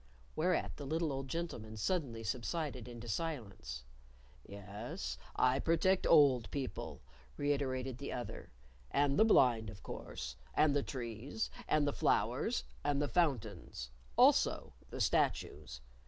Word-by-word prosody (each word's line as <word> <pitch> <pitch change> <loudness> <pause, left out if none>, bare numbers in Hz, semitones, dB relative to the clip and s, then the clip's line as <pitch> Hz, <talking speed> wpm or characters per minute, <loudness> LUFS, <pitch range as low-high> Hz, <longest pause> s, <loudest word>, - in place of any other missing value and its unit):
Whereat 180 +4 +1
the 145 - -6
little 160 0 0
old 135 0 -4
gentleman 125 -9 -4
suddenly 120 - -1
subsided 130 +2 -2
into 120 -1 -8
silence. 100 - -4 0.6
"Yes, 105 - -6 0.2
I 125 +1 +3
protect 180 +5 +3
old 140 -7 +6
people," 135 -3 -4 0.3
reiterated 135 -3 -1
the 140 - -4
other, 120 -1 -5 0.4
"and 140 +3 +2
the - - +9
blind, 120 - +5
of 100 -1 -10
course, - - -6 0.2
and 150 -2 +4
the 145 - +3
trees 125 - -4 0.2
and 150 -1 +3
the 145 - +1
flowers 65 - +1 0.2
and 145 -1 +1
the 145 - +1
fountains. 110 - -1 0.3
Also, - - +4 0.2
the - - -6
statues. 60 -1 0
135 Hz, 125 wpm, -35 LUFS, 115-150 Hz, 0.6 s, the